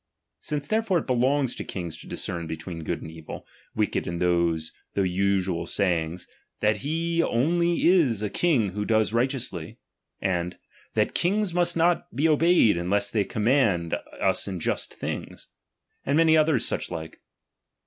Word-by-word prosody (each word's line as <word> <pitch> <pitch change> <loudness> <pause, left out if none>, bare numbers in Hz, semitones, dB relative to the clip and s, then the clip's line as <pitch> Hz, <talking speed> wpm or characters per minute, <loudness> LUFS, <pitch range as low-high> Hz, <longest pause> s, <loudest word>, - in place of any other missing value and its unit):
Since 145 -1 -3
therefore 215 +1 +1
it 165 - -2
belongs 130 +1 +1
^^| - - -11
to - - -4
kings 85 -4 -5
to - - -11
discern 85 -2 -3
between 80 +1 -6
good - - -3
and 80 - -8
evil, 80 -1 -9 0.3
wicked - - 0
^^| - - -8
are 85 - -3
those, 85 -2 +1 0.2
though 100 - +2
usual, 95 -2 0
sayings, 85 -3 -1 0.3
that 105 0 +2
he 165 +3 -1
oidy 170 +5 +2
is 145 - +4
a 105 - -1
^H - - -22
king 140 - +2
who 105 +3 -3
does 110 0 +1
righteously, 120 - -1 0.4
and 90 -2 -1 0.4
that - - +1
kings 195 +1 +1
must 175 -1 +1
^^| - - -2
not 170 +1 +2
be 145 +5 +3
obeyed 160 - +4
unless 100 +4 0
they 105 -3 +2
command 105 -6 +1 0.3
us 95 +1 +1
Just 85 - -2
^^M - - -18
things; - - -6 0.6
and 140 +2 +1
many 160 -1 +5
other 155 -2 +4
such - - -2
like. 80 0 -7
110 Hz, 170 wpm, -26 LUFS, -, 0.6 s, many